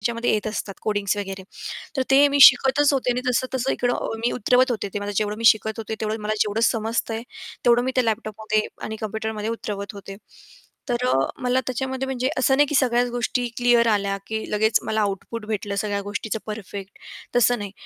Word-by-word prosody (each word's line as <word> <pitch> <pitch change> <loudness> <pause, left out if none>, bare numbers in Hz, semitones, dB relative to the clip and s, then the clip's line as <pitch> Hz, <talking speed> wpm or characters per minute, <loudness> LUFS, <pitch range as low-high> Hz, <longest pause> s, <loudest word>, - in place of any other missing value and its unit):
त्याच्यामध्ये 235 +2 0
येत 215 0 -1
असतात 215 -2 -4
कोडिंग्स 205 -2 0
वगैरे 195 -1 -5 0.5
तर - - +3
ते 280 +2 +7
मी 285 0 0
शिकतच 270 +3 +7
होते 255 -2 +1
आणि 245 +1 -1
तसं-तसं 255 +1 0
इकडं 245 -2 -1
मी 240 - +2
उतरवत 250 +2 +3
होते 210 -4 -3
ते 205 - -2
मला 205 0 -4
जेवढं 210 +1 -1
मी 230 - -3
शिकत 220 0 +4
होते 220 0 -4
तेवढं 220 +1 -2
मला 210 +1 -1
जेवढं 210 +2 +1
समजतंय 225 0 0 0.4
तेवढं 240 0 +5
मी 260 - -1
त्या 255 - +3
लॅपटॉपमध्ये 215 -1 -1 0.2
आणि 220 - -4
कम्प्युटरमध्ये 220 0 -3
उतरवत 205 -3 -5
होते. 200 -1 -9 0.7
तर 245 +1 0
अ, - - +2 0.3
मला 250 +1 +2
त्याच्यामध्ये 265 +1 -2
म्हणजे 260 -1 -1
असं 265 +1 +3
नाही 290 +1 +5
की 295 - -2
सगळ्याच 245 -2 +3
गोष्टी 245 +1 -1
क्लिअर 240 -1 +4
आल्या 200 -2 +1
की 220 0 -3
लगेच 215 +1 +3
मला 220 0 0
आउटपुट 210 +2 -3
भेटलं 205 -2 -3
सगळ्या 200 0 -1
गोष्टीचं 205 +2 -4
परफेक्ट 200 -2 -7 0.4
तसं 245 0 +4
नाही 205 -1 -6
220 Hz, 190 wpm, -23 LUFS, 210-245 Hz, 0.7 s, ते